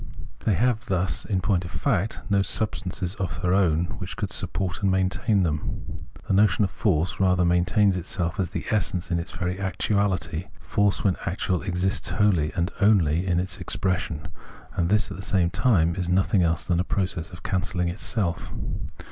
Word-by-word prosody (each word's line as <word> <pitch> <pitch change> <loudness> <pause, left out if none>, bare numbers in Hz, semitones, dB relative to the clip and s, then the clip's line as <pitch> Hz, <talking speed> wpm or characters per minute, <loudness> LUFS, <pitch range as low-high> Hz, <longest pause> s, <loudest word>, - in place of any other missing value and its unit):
They 105 - +3
have 120 +2 +1
thus, 95 -1 -1
in 95 -4 0
point 90 -2 +1
of 85 - -6
fact, 105 -2 -1
no 100 -1 +3
substances 95 -2 -2
of 95 -2 -3
their 90 0 +1
own 85 -4 +3
which 95 +1 -6
could 100 -4 -2
support 90 0 -2
and 100 - +2
maintain 95 +2 +2
them. 75 -1 -3 0.3
The - - +1
notion 100 0 +4
of 95 - 0
force 95 0 0
rather 90 -2 +3
maintains 90 +3 +3
itself 85 0 -3
as 90 -3 0
the - - -4
essence 90 -4 -1
in 85 - +2
its 85 - -5
very 90 +2 -3
actual 100 +1 +1
ity: 90 0 -3
force 100 -1 +1
when 95 -3 +2
actual 90 0 0
exists 95 +1 -1
wholly 90 -5 +2
and 85 +1 0
only 95 -4 +4
in 90 -1 +2
its 90 +1 -4
expression; 90 -5 -2 0.5
and 85 0 +1
this, 105 +1 +2
at - - -6
the - - -6
same 95 -4 +1
time, 85 -10 +3
is 90 -2 -2
nothing 95 +1 +3
else 80 -2 +1
than 85 -2 +1
a - - +2
process 90 -2 -2
of 90 -3 -12
cancelling 90 -2 -1
itself. 90 0 -2
95 Hz, 180 wpm, -25 LUFS, 85-100 Hz, 0.5 s, notion